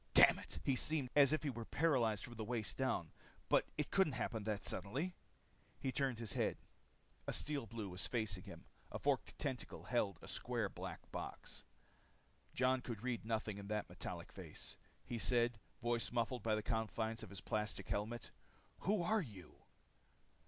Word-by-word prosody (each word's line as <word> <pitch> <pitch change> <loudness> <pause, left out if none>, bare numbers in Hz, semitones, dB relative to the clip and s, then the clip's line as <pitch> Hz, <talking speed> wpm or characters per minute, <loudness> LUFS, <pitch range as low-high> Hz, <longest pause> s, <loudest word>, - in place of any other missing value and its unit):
Damn - - +9
it, - - -7
he 135 - +3
seemed 140 -1 +1
as 140 -1 +8
if 155 - +2
he 145 - +1
were 120 -1 -4
paralyzed 120 -7 +3
from 120 - -6
the 110 -1 -4
waist 115 -1 -1
down. 130 -11 +1 0.4
But - - +5
it 150 - -1
couldn't 190 -7 +4
happen 110 -3 -1
that 105 -2 -1
suddenly. 145 - -1 0.7
He 130 - 0
turned 130 -3 +1
his 115 -2 -4
head. - - +1 0.7
A - - 0
Steel 145 -6 -1
Blue 105 -5 -4
stood 100 - -1
facing 105 -6 0
him. - - -9 0.3
A - - -2
forked - - +1
tentacle 130 -3 -3
held 105 -7 +1
a - - -8
square - - 0
black - - -7
box. - - -6 0.9
Jon 130 0 +4
could 115 -3 -5
read 125 -4 -1
nothing 110 -2 -1
in 100 - -7
that 105 0 -1
metallic - - -5
face. - - -7 0.3
He 120 - -2
said, 120 +2 +3 0.2
voice 120 -1 +1
muffled 120 +1 +1
by 110 0 +3
the 110 - -1
confines 110 0 0
of 110 - -7
the 100 -1 -6
plastic 105 0 -1
helmet, 110 +3 -1 0.5
"Who 195 -2 +2
are 215 +5 +3
you?" 100 - -9
115 Hz, 175 wpm, -40 LUFS, 110-130 Hz, 0.9 s, Damn